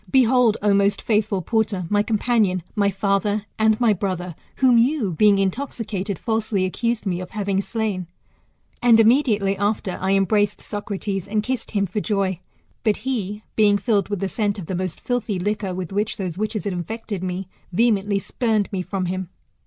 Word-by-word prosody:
Behold, 250 Hz, -3 st, +4 dB
O 205 Hz, -1 st, +4 dB
most 200 Hz, 0 st, +3 dB
faithful 210 Hz, -4 st, 0 dB
porter, 215 Hz, -3 st, 0 dB
my 205 Hz, +3 st, +2 dB
companion, 210 Hz, -4 st, +1 dB
my 200 Hz, -2 st, +3 dB
father, 200 Hz, +2 st, 0 dB
and 220 Hz, 0 st, +3 dB
my 235 Hz, -3 st, +4 dB
brother, 180 Hz, -2 st, -3 dB, 0.2 s
who 255 Hz, -2 st, +4 dB
you, 235 Hz, -, +2 dB
being 205 Hz, +4 st, +5 dB
intoxi 225 Hz, +5 st, -2 dB
cated, 200 Hz, -2 st, -3 dB
falsely 220 Hz, -3 st, 0 dB
accused 230 Hz, +4 st, -1 dB
me 180 Hz, -2 st, -1 dB
of 180 Hz, -, -7 dB
having 200 Hz, -3 st, -1 dB
slain.. 205 Hz, -5 st, -3 dB, 0.7 s
And 240 Hz, -2 st, +6 dB
inunediately 220 Hz, -4 st, +3 dB
after 205 Hz, -2 st, -1 dB
I 190 Hz, +1 st, +1 dB
embraced 205 Hz, +1 st, +2 dB
Socrates, 200 Hz, -2 st, -4 dB
and 210 Hz, +1 st, 0 dB
kissed 255 Hz, 0 st, -3 dB
him 200 Hz, -, +2 dB
for 195 Hz, +3 st, -3 dB
joy; 195 Hz, -5 st, 0 dB, 0.4 s
but 215 Hz, -3 st, +2 dB
he, 210 Hz, -5 st, -2 dB
being 205 Hz, -2 st, +4 dB
filled 205 Hz, -3 st, +1 dB
with 205 Hz, -3 st, -3 dB
the 195 Hz, -, 0 dB
scent 205 Hz, 0 st, -1 dB
of 190 Hz, -, -6 dB
the 190 Hz, -, -4 dB
most 185 Hz, -1 st, -3 dB
filthy 240 Hz, -5 st, -2 dB
liquor 205 Hz, +1 st, -2 dB
with 185 Hz, -1 st, -5 dB
which 210 Hz, +2 st, -1 dB
those 185 Hz, -4 st, -3 dB
witches 215 Hz, +1 st, -2 dB
had 200 Hz, -2 st, -2 dB
infected 205 Hz, +2 st, -5 dB
me, 185 Hz, 0 st, -3 dB, 0.2 s
vehemently 205 Hz, 0 st, +2 dB
spurned 215 Hz, 0 st, 0 dB
mc 190 Hz, -3 st, -2 dB
from 190 Hz, -2 st, -1 dB
him. 185 Hz, 0 st, -3 dB
205 Hz, 175 wpm, -22 LUFS, 190-220 Hz, 0.7 s, And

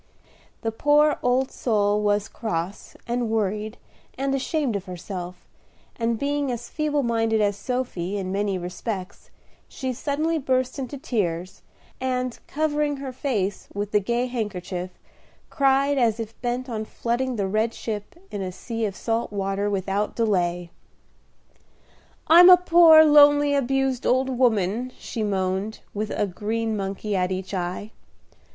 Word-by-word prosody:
The 225 Hz, -, 0 dB
poor 295 Hz, +5 st, +3 dB
old 255 Hz, +2 st, +1 dB
soul 210 Hz, -3 st, +1 dB
was 205 Hz, 0 st, +1 dB
cross, 180 Hz, -3 st, -4 dB
and 240 Hz, -1 st, -1 dB
worried, 215 Hz, 0 st, -1 dB, 0.4 s
and 270 Hz, +1 st, -1 dB
ashamed 275 Hz, -2 st, -1 dB
of 195 Hz, -1 st, -3 dB
herself, 180 Hz, -1 st, -7 dB, 0.5 s
and 230 Hz, -1 st, 0 dB
being 285 Hz, +1 st, -1 dB
as 240 Hz, 0 st, -5 dB
feeble 300 Hz, -2 st, 0 dB
minded 225 Hz, -2 st, +1 dB
as 205 Hz, -1 st, +2 dB
Sophy 205 Hz, -5 st, -3 dB
in 185 Hz, -2 st, -3 dB
many 200 Hz, -1 st, 0 dB
respects, 185 Hz, +2 st, -6 dB, 0.4 s
she 260 Hz, -1 st, -4 dB
suddenly 305 Hz, +5 st, -1 dB
burst 260 Hz, -1 st, 0 dB
into 270 Hz, +2 st, -5 dB
tears, 185 Hz, -, -2 dB, 0.4 s
and, 255 Hz, -1 st, -2 dB
covering 295 Hz, -1 st, 0 dB
her 270 Hz, -1 st, -5 dB
face 210 Hz, -8 st, -2 dB
with 205 Hz, 0 st, -3 dB
the 210 Hz, -, +4 dB
gay 235 Hz, +5 st, 0 dB
handkerchief, 190 Hz, -7 st, -4 dB, 0.6 s
cried 275 Hz, 0 st, +3 dB
as 230 Hz, -2 st, +2 dB
if 225 Hz, 0 st, -7 dB
bent 245 Hz, +1 st, -2 dB
on 220 Hz, -3 st, -3 dB
floating 240 Hz, +3 st, -2 dB
the 200 Hz, -3 st, -1 dB
red 215 Hz, +4 st, 0 dB
ship 210 Hz, +1 st, -6 dB, 0.2 s
in 205 Hz, -, -4 dB
a 185 Hz, -1 st, -3 dB
sea 225 Hz, +4 st, -4 dB
of 200 Hz, -2 st, -3 dB
salt 225 Hz, +2 st, -2 dB
water 200 Hz, 0 st, -1 dB
without 200 Hz, +1 st, -1 dB
delay. 175 Hz, -6 st, 0 dB, 1.5 s
"I'm 350 Hz, +3 st, +9 dB
a 365 Hz, -, +10 dB
poor, 335 Hz, -3 st, +7 dB
lonely, 290 Hz, -1 st, +6 dB
abused 270 Hz, -1 st, 0 dB
old 260 Hz, +1 st, +2 dB
woman," 235 Hz, 0 st, +1 dB
she 230 Hz, -, -5 dB
moaned, 195 Hz, +1 st, -1 dB
with 210 Hz, +1 st, -3 dB
a -, -, 0 dB
green 220 Hz, +4 st, -2 dB
monkey 200 Hz, +1 st, -3 dB
at 180 Hz, 0 st, 0 dB
each 185 Hz, +1 st, -4 dB
eye. 185 Hz, +3 st, -3 dB
225 Hz, 145 wpm, -24 LUFS, 200-260 Hz, 1.5 s, a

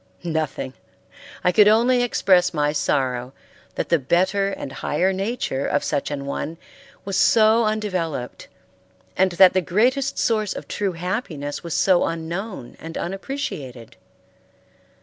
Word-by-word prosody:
Nothing. 155 Hz, -6 st, -3 dB, 0.7 s
I 180 Hz, -, +4 dB
could 210 Hz, +2 st, +6 dB
only 240 Hz, +4 st, +4 dB
express 180 Hz, -7 st, +2 dB
my 150 Hz, -1 st, +1 dB
sorrow 130 Hz, -4 st, -1 dB, 0.4 s
that -, -, -3 dB
the 170 Hz, -, +3 dB
better 190 Hz, +8 st, +1 dB
and 195 Hz, -, -6 dB
higher 180 Hz, +9 st, 0 dB
nature 195 Hz, -, -2 dB
of -, -, 0 dB
such 145 Hz, -2 st, -1 dB
an 140 Hz, -1 st, -4 dB
one 155 Hz, +3 st, -4 dB, 0.5 s
was 195 Hz, -1 st, -3 dB
so 220 Hz, +2 st, +4 dB
undeveloped, 185 Hz, -, -3 dB, 0.7 s
and 190 Hz, -1 st, +2 dB
that 185 Hz, +1 st, +7 dB
the 185 Hz, -, +2 dB
greatest 245 Hz, -, +1 dB
source 215 Hz, -3 st, +1 dB
of -, -, -7 dB
true 200 Hz, -3 st, -2 dB
happiness 170 Hz, -, -4 dB
was 170 Hz, -2 st, -4 dB
so 185 Hz, -2 st, +3 dB
unknown 165 Hz, -, -5 dB
and 165 Hz, 0 st, -7 dB
unappreciated. 155 Hz, -, -5 dB
180 Hz, 130 wpm, -22 LUFS, 150-210 Hz, 0.7 s, that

